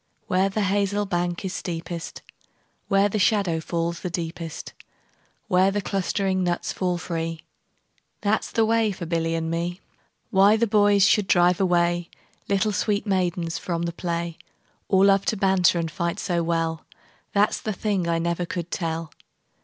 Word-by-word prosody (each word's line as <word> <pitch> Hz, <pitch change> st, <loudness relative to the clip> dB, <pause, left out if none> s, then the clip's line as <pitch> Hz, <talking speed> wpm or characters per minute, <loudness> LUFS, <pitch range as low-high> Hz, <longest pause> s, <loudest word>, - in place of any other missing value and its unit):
Where 190 Hz, +2 st, +2 dB
the 210 Hz, +2 st, -1 dB
hazel 200 Hz, +1 st, +1 dB
bank 175 Hz, 0 st, -2 dB
is 190 Hz, -, -3 dB
steepest, 170 Hz, -1 st, -5 dB, 0.6 s
Where 195 Hz, +1 st, +4 dB
the 210 Hz, +1 st, -2 dB
shadow 195 Hz, -5 st, +2 dB
falls 170 Hz, +1 st, -2 dB
the 180 Hz, -, -4 dB
deepest, 165 Hz, -1 st, -5 dB, 0.7 s
Where 185 Hz, -1 st, +4 dB
the 205 Hz, +1 st, -1 dB
clustering 190 Hz, -1 st, -1 dB
nuts 175 Hz, -1 st, -1 dB
fall 180 Hz, -2 st, -1 dB
free, 165 Hz, -1 st, -3 dB
15 -, -, -40 dB, 0.8 s
That 210 Hz, +1 st, +1 dB
's -, -, -7 dB
the 225 Hz, -, +2 dB
way 225 Hz, -1 st, +2 dB
for 185 Hz, -3 st, -6 dB
Billy 165 Hz, 0 st, -1 dB
and 160 Hz, 0 st, -2 dB
me. 170 Hz, +2 st, -2 dB, 0.5 s
Why 200 Hz, +3 st, +5 dB
the 235 Hz, -, +2 dB
boys 205 Hz, -2 st, +4 dB
should 205 Hz, -1 st, +3 dB
drive 175 Hz, -1 st, +4 dB
away 175 Hz, -1 st, +1 dB, 0.4 s
Little 200 Hz, +2 st, +2 dB
sweet 205 Hz, 0 st, 0 dB
maidens 180 Hz, -4 st, -1 dB
from 170 Hz, -2 st, -3 dB
the 170 Hz, 0 st, -2 dB
play, 170 Hz, -1 st, -3 dB, 0.5 s
Or 190 Hz, 0 st, +4 dB
love 195 Hz, 0 st, +4 dB
to 215 Hz, -, 0 dB
banter 190 Hz, -2 st, +3 dB
and 165 Hz, -1 st, -2 dB
fight 170 Hz, 0 st, -2 dB
so 175 Hz, -2 st, 0 dB
well, 165 Hz, -1 st, -1 dB, 0.5 s
That 205 Hz, +1 st, +3 dB
's -, -, -4 dB
the 215 Hz, -, -2 dB
thing 195 Hz, -3 st, -1 dB
I 165 Hz, -, +2 dB
never 170 Hz, +1 st, -1 dB
could 175 Hz, -1 st, -5 dB
tell. 165 Hz, -2 st, -3 dB
180 Hz, 170 wpm, -24 LUFS, 170-200 Hz, 0.8 s, Why